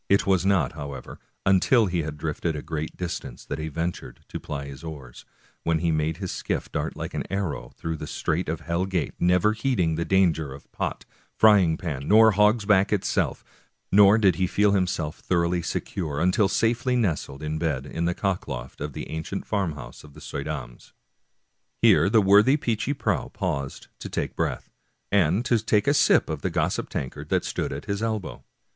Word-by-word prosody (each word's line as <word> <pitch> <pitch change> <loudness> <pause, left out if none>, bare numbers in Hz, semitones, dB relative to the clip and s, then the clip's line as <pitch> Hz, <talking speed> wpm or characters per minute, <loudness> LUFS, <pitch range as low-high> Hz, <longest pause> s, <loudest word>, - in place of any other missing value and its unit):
It 100 - +4
was 95 -1 +2
not, 90 -10 +2
however, 70 -2 -8 0.3
until 95 +5 +4
he 90 -3 -1
had 75 -1 -5
drifted 80 +2 -2
a 75 - -5
great 80 -1 -5
distance 85 -8 -5
that - - -4
he 80 - -3
ventured 85 +3 -4
to - - -5
ply 70 -1 -5
his 70 +1 -10
oars, 70 -7 -9 0.4
when 80 -1 +1
he 85 +1 0
made 80 +1 0
his 95 -1 -4
skiff - - -3
dart - - -3
like - - -6
an - - -2
arrow 75 -11 -3
through 80 -1 -3
the - - -7
strait 85 +1 -2
of 80 0 -3
Hell 85 +4 -1
Gate, 90 -4 -1
never 90 +4 +3
heeding 110 -8 0
the 85 - 0
danger 85 -7 +2
of 70 - -16
Pot, - - -4 0.3
Frying 95 -7 +5
Pan, 75 -6 -4
nor 110 +1 +7
Hog's 105 +2 +3
Back 100 -1 +3
itself, 105 -3 0 0.5
nor 100 +1 +7
did 95 -7 +3
he 95 - +1
feel 105 +3 +3
himself 90 -5 -1
thoroughly 85 -1 0
secure 80 -3 -3
until 90 +3 +3
safely 120 +5 +1
nestled 80 - -1
in 75 +1 -2
bed 75 -5 -1
in 85 +3 -3
the 85 +1 0
cockloft 70 -12 -3
of 75 -1 -4
the - - -6
ancient 80 +5 -5
farmhouse 85 -10 -3
of 75 -1 -15
the - - -11
Suydams. 70 -5 -6 0.8
Here - - +5
the 110 +1 +5
worthy 105 +8 +6
Peechy 120 +1 -1
Prauw 125 -2 -1
paused 80 -10 -3
to - - -7
take - - -3
breath, - - -2 0.4
and 100 +3 +3
to 120 -2 +3
take 105 -1 +1
a 145 - +3
sip - - +4
of 80 -3 -4
the - - -1
gossip - - -1
tankard 65 - -5
that - - +1
stood - - -2
at - - -6
his 100 0 -2
elbow. 110 -3 -3
90 Hz, 190 wpm, -25 LUFS, 75-100 Hz, 0.8 s, nor